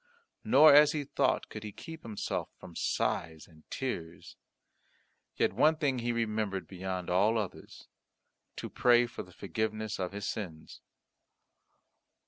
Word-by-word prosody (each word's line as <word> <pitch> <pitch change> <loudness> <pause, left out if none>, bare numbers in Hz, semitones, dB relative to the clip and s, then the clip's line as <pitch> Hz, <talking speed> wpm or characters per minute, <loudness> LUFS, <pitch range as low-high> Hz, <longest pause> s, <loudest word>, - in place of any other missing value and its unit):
Nor, 145 +3 +7
as 150 +1 +7
he 150 -2 -2
thought, 135 -1 0
could 105 - -8
he 105 - -6
keep 160 - -10
himself 110 -3 -4
from 90 -3 -12
sighs 80 0 -1
and 80 -2 -21
tears; 85 -11 -5 1.0
yet - - +1
one 150 +9 +4
thing 140 -4 0
he 120 0 -1
remembered 105 -6 -2
beyond 95 -1 -5
all 100 +6 +3
others 105 -4 -6 0.7
to - - -5
pray 120 0 +4
for 120 - -7
forgiveness 110 +3 -3
of 90 -1 -2
his 100 0 -5
sins. 85 -7 -6
110 Hz, 130 wpm, -31 LUFS, 95-125 Hz, 1.0 s, Nor